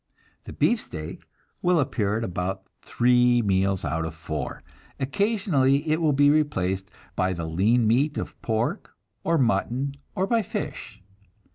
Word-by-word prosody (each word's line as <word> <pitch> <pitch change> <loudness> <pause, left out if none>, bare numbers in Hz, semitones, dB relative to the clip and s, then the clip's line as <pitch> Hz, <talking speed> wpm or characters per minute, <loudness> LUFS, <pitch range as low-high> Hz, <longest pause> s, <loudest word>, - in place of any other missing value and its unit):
The - - -8
beefsteak 90 - -2 0.3
will 180 -1 +3
appear 110 -7 0
at 115 - -2
about 95 0 -3 0.2
three 125 0 +3
meals 95 -1 +1
out 80 +1 -1
of 80 0 -5
four; 75 -3 -5 0.4
occasionally 145 -4 +1
it 155 +2 +1
will 155 -2 +3
be 145 +1 +5
replaced 95 -11 0 0.3
by 95 0 +1
the 85 -2 -4
lean 105 +9 +2
meat 135 +7 +2
of - - -6
pork 110 +1 -2 0.3
or 165 0 +2
mutton, 130 +1 0 0.2
or 190 - +1
by 230 +3 +2
fish. 130 - -6
120 Hz, 140 wpm, -25 LUFS, 95-150 Hz, 0.4 s, be